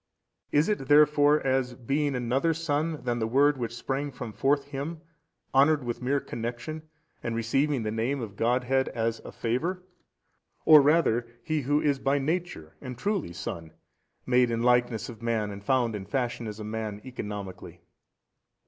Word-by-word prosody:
Is 150 +2 +3
it 205 -11 -1
therefore 150 0 +5
as 130 -2 +1
being 140 +3 -1
another 130 +7 +1
son 160 0 -1
than 120 -1 -1
the 110 - 0
Word 140 +3 +3
Which 120 -1 -3
sprang 135 +4 -2
from 125 -4 -7
forth 140 +4 +2
Him, 145 +3 -5 0.5
honoured 145 +1 +4
with 120 0 -4
mere 135 +3 +1
connection, 120 +7 -5 0.4
and 115 - -3
receiving 135 +3 +1
the 110 - -2
Name 115 +6 -1
of 110 -5 -6
Godhead 125 +4 +1
as 115 -1 -1
a - - -10
favour; 165 +11 -2 0.8
or 155 -2 +9
rather 140 -6 +3 0.2
He 155 +2 -1
Who 145 +3 +2
is 145 -3 +1
by 135 +1 +1
Nature 145 - -3
and 125 -3 -7
truly 195 - -1
Son, 85 -2 -6 0.5
made 125 -1 +3
in 115 0 -1
likeness 120 -2 +2
of 115 -2 -10
man 115 -3 -1
and 100 0 -9
found 120 -1 +1
in 95 -2 -6
fashion 120 -1 -2
as 105 0 -7
a - - -5
man 110 -1 -4
economically? 95 -8 -7
125 Hz, 165 wpm, -27 LUFS, 115-145 Hz, 0.8 s, or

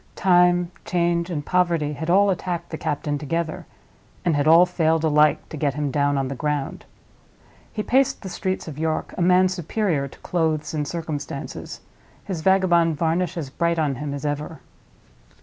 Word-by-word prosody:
Time, 175 -1 +3
change, 170 -1 0
and 150 -4 -3
poverty 170 -5 +1
had 160 +3 -5
all 200 +3 +5
attacked 175 -1 -4
the 160 - -4
captain 145 0 -2
together, 160 +2 -3 0.6
and 170 -3 +2
had 145 +1 +1
all 165 +3 +8
failed 165 -3 +1
alike 150 -1 +3
to - - -7
get 140 -2 0
him 145 -2 -2
down 145 0 +1
on 135 -1 0
the 135 - -4
ground. 145 0 -3 0.9
He 210 - -3
paced 265 0 +1
the - - -5
streets 185 0 -3
of 150 -2 -7
York, 160 0 -2
a - - -3
man 180 +1 +5
superior 180 -4 -1
to - - -16
clothes 160 -4 -1
and 150 -2 -2
circumstances—his 160 +3 -7
vagabond 175 -3 +3
varnish 170 +3 0
as 145 -5 -5
bright 170 +2 0
on 150 -3 +1
him 145 +3 -5
as 140 +1 -5
ever. 150 +2 -3
160 Hz, 165 wpm, -23 LUFS, 150-175 Hz, 0.9 s, all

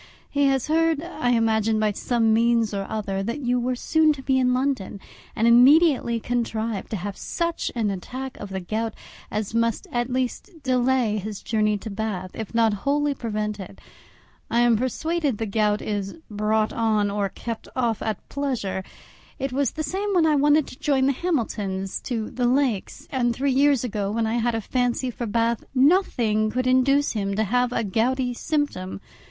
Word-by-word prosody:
He 285 0 +2
had 270 -2 +2
heard, 320 0 +1
I 335 -8 -2
imagine, 220 -2 +2
by 215 -1 +2
some 225 +1 +1
means 230 -1 +2
or 195 -1 -3
other, 200 -3 -2
that 235 +8 -3
you 245 -1 +1
were 250 +1 -1
soon 315 +4 +3
to 270 -2 -10
be 265 -1 +2
in 250 -1 +3
London, 255 -6 -1 0.4
and 225 - +2
immediately 250 0 +5
contrived 225 -3 -2
to - - -3
have 200 +1 -4
such 335 0 -2
an 220 -4 0
attack 255 +8 -6
of 205 - -7
the 190 -1 -4
gout 220 +4 -3 0.3
as 215 0 -3
must 230 -1 0
at 240 +1 -1
least 260 +7 -3
delay 250 -4 +2
his 210 0 -6
journey 215 -2 +1
to 215 +2 -7
Bath, 195 -3 -3
if 220 -3 -6
not 225 -2 +4
wholly 290 +1 +1
prevent 215 -4 -3
it. 195 0 -9 0.7
I 235 - +2
am 240 -1 +5
persuaded 280 +3 -1
the 225 - -2
gout 210 0 +1
is 200 -2 -3 0.2
brought 215 +1 +1
on 215 -3 +1
or 200 -1 -1
kept 230 +3 -6
off 235 -4 0
at 215 -3 -4
pleasure; 250 -10 -2 0.5
it 270 -1 -3
was 275 -1 +1
the 310 - -5
same 395 +7 -2
when 340 -3 +4
I 310 -1 +4
wanted 295 +1 +4
to 255 - -12
join 275 -3 +2
the 275 - +4
Hamiltons 215 - -2
to 225 -4 -3
the 245 -1 0
Lakes; 250 -6 0
and 240 -3 +1
three 275 +2 0
years 275 -1 +3
ago, 210 -4 -2
when 225 +2 0
I 225 +2 0
had 235 0 0
a 225 - -1
fancy 250 +2 -1
for 240 0 -5
Bath, 230 +1 0
nothing 250 - +3
could 255 +3 -1
induce 265 +3 +3
him 200 -2 -2
to 220 - +1
have 245 +3 +1
a 230 - 0
gouty 245 +5 0
symptom. 265 -11 -2
235 Hz, 185 wpm, -24 LUFS, 215-265 Hz, 0.7 s, immediately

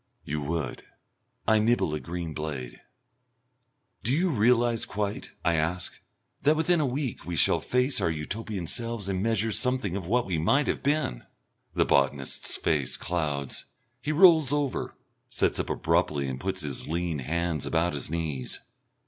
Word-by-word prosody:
"You 75 +1 -3
would." 75 -2 -3 0.7
I 110 -1 +5
nibble 110 -7 +2
a 75 - -1
green 85 -1 -5
blade. 70 -6 -5 1.2
"Do 120 - 0
you 170 +6 +2
realise 120 -1 +3
quite," 105 0 -3 0.2
I 85 - +4
ask, 85 +3 -1 0.5
"that 150 +3 +4
within 165 +2 +2
a 150 - +2
week 130 -1 -3
we 85 - -4
shall 75 - +3
face 125 +2 +1
our - - +2
Utopian 95 +5 -4
selves 115 +2 -1
and 95 -1 -1
measure 110 0 +1
something 125 -5 +1
of 95 -4 -4
what 120 +4 +2
we 90 -4 -1
might 135 - +3
have - - -1
been?" 140 - 0 0.5
The - - +3
botanist's 70 -1 +1
face 70 -5 0
clouds. 75 -5 -2 0.4
He 150 - -1
rolls 160 -4 +6
over, 145 -2 -1 0.3
sits - - +1
up - - -2
abruptly 70 -2 +1
and 65 -1 -4
puts 95 +1 -2
his 75 -4 -3
lean 85 -1 -1
hands 80 +2 -1
about 85 +1 +1
his 70 -2 -3
knees. 75 -5 -3
90 Hz, 155 wpm, -28 LUFS, 80-120 Hz, 1.2 s, rolls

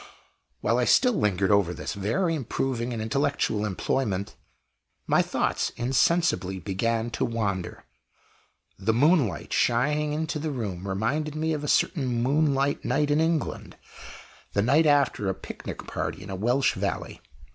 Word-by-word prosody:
While - - +2
I - - +2
still 250 -2 +4
lingered 100 - +1
over 100 -4 +3
this - - -5
very 115 - 0
improving 125 -3 -2
and 115 -2 -3
intellectual 135 -3 0
employment, 100 0 -2 0.7
my - - +3
thoughts - - -1
insensibly 125 - +1
began 115 +4 -1
to - - -2
wander. 100 -6 -2 1.0
The 110 +3 +1
moonlight 135 - +2
shining 150 +5 +2
into 155 0 -2
the 155 +1 -2
room 100 -9 -4
reminded 140 +11 -1
me 160 +1 0
of 150 -1 -3
a - - -3
certain 140 -1 +2
moonlight 140 +3 +1
night 145 +4 +1
in 150 +2 +3
England 160 -1 -2 0.8
the 100 - +2
night 145 +7 +4
after 140 -8 +2
a 95 - -1
picnic - - -8
party - - -4
in 95 - -8
a - - -3
Welsh 120 +7 +2
valley. 100 -1 -4
125 Hz, 145 wpm, -26 LUFS, 100-150 Hz, 1.0 s, still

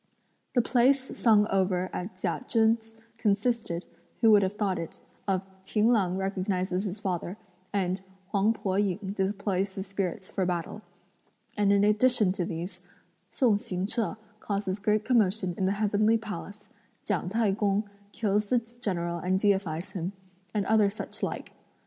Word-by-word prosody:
The 245 - +4
plays 260 +3 +3
sung 215 -3 +5
over 185 -1 +1
at 185 +1 -5
Chia 185 - -2
Chen's 225 0 +2 0.2
consisted, 210 -4 0 0.3
who 225 -2 +6
would 205 -1 +7
have 190 0 0
thought 200 -4 0
it, 165 - -7 0.3
of 190 -1 +1 0.2
"Ting 215 +4 +2
L'ang 190 -6 +2
recognises 190 0 -1
his 200 +1 -4
father," 185 -1 -3 0.3
and 190 -1 0 0.3
"Huang 205 +2 +3
Po 190 -4 -2
ying 200 -3 +1 0.2
deploys 195 -1 -1
the 190 - -3
spirits 190 0 -3
for 190 - -2
battle," 180 +3 -2 0.7
and 205 -1 +3
in 200 0 +4
addition 210 -1 +4
to 185 -2 -2
these, 170 +2 -5 0.5
"Sung 225 -6 +3
Hsing 185 -2 -3
che 225 +1 -1 0.2
causes 200 -2 -2
great 210 +1 +1
commotion 210 -6 +2
in 185 - 0
the 195 - +2
heavenly 210 +2 +3
palace;" 85 - -7 0.4
"Ghiang 180 - -1
T'ai 215 -1 +2
kung 205 0 +1 0.2
kills 210 -1 0
the 250 - +4 0.2
general 170 -6 -2
and 185 +2 +1
deifies 190 -4 0
him," 185 +1 -3 0.4
and 205 -2 0
other 215 -1 +4
such 205 - -6
like. - - -3
200 Hz, 155 wpm, -28 LUFS, 185-215 Hz, 0.7 s, would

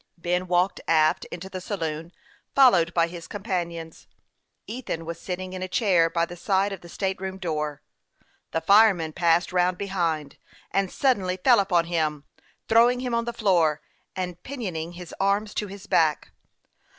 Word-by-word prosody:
Ben 180 +2 -1
walked 180 +2 +1
aft 155 -1 +3
into 180 +2 -8
the 185 -1 -7
saloon, 165 -4 -4 0.4
followed 190 -12 +6
by 170 -1 +3
his 170 0 -9
companions. 170 -6 -5 0.6
Ethan 220 -9 -5
was 170 0 -6
sitting 185 0 -5
in 185 - -5
a 185 - -2
chair 180 -5 +3
by 170 0 +1
the 175 - -9
side 195 +2 +1
of 190 - -8
the 170 - -13
state 190 +1 -3
room 190 0 -4
door. 150 -5 -3 0.7
The 165 - -2
fireman 195 -6 +5
passed 170 +2 +2
round 180 0 +2
behind, 170 -7 -2 0.3
and 195 -1 +1
suddenly 195 -9 +1
fell 240 +5 +5
upon 180 -4 +2
him, 155 -4 -1 0.4
throwing 240 +2 +4
him 250 -2 -3
on 235 0 +1
the 235 - -2
floor, 175 -9 +2 0.4
and 180 -2 -4
pinioning 180 - -5
his 175 0 -10
arms 200 +2 +1
to 210 - -2
his 200 +1 -10
back. 155 -6 +1
180 Hz, 165 wpm, -25 LUFS, 165-200 Hz, 0.7 s, followed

